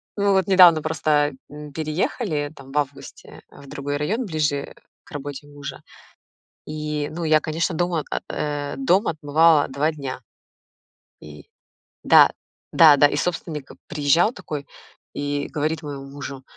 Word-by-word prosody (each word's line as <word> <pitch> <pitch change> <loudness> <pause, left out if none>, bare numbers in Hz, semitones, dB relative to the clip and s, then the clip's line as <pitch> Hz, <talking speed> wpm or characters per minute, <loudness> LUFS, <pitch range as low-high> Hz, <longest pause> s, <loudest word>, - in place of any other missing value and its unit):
Мы 200 -1 +1
вот 190 -2 +2
недавно 180 -5 +7
просто, 150 -2 +1 0.2
м, 150 0 -10
переехали, 155 - -2
там, 135 -2 -13
в 145 - -4
августе, 140 -1 -5
э, - - -15
в 140 - -14
другой 145 +1 -4
район, 215 - -1
ближе 150 -6 -2 0.3
к - - -21
работе 145 0 -7
мужа, 145 -1 -9 0.8
и, 150 -1 -4
ну, 170 +2 -5
я, 155 -1 +4
конечно, 160 +3 -2
дом, 175 +2 -1
о 160 -3 0 0.3
э, 145 -1 -3
дом 215 -6 +2
отмывала 155 0 +3
2 140 +4 0
дня. 140 -5 -6 1.0
И 75 -1 -13 0.6
да, - - +7 0.4
да, 155 -3 +7
да, 145 - +6
и 145 - -1
собственник 160 -3 -3 0.2
приезжал 165 - +2
такой, 145 - -7 0.5
и 145 0 -3
говорит 155 +1 -2
моему 140 -2 -7
мужу: 140 -1 -8
150 Hz, 145 wpm, -22 LUFS, 145-160 Hz, 1.0 s, недавно